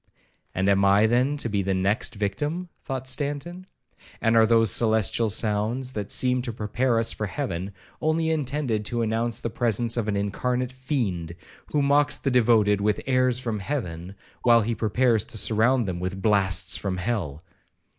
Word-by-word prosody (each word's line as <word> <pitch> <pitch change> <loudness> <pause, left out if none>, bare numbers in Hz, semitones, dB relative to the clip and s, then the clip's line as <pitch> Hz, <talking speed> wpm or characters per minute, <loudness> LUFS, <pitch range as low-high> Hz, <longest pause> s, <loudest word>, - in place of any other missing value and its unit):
'And 95 +1 0
am 100 0 +3
I 100 +2 +5
then 125 +6 +1
to 130 - -3
be 100 -3 -1
the 95 0 -1
next 100 +6 -1
victim?' 145 - -3
thought 130 -1 -5
Stanton; 145 +7 -4 0.5
'and 115 0 +2
are 110 -1 +5
those 115 -3 +4
celestial 110 0 +1
sounds, 110 +5 +1
that 105 -4 -5
seem 125 0 +2
to 120 -1 -4
prepare 115 +3 -1
us 115 - +1
for 105 - -4
heaven, 100 - -4 0.3
only 160 +1 +1
intended 140 -7 -1
to 120 +2 -1
announce 115 +1 -1
the 115 - -3
presence 115 0 0
of 115 -3 -1
an 100 -1 0
incarnate 125 +5 -2
fiend, 115 - -3 0.3
who 145 -1 0
mocks 145 +1 +2
the 135 - -2
devoted 110 -4 +3
with 105 0 +1
"airs 130 -2 +2
from 115 -4 -3
heaven," 95 - -5 0.3
while 120 -1 +5
he 115 +3 -1
prepares 115 0 +1
to - - -2
surround 115 +3 +2
them 90 -2 -3
with 95 +2 -4
"blasts 100 -2 +2
from 95 -2 -3
hell"?' 90 -7 -3
115 Hz, 170 wpm, -25 LUFS, 100-130 Hz, 0.5 s, I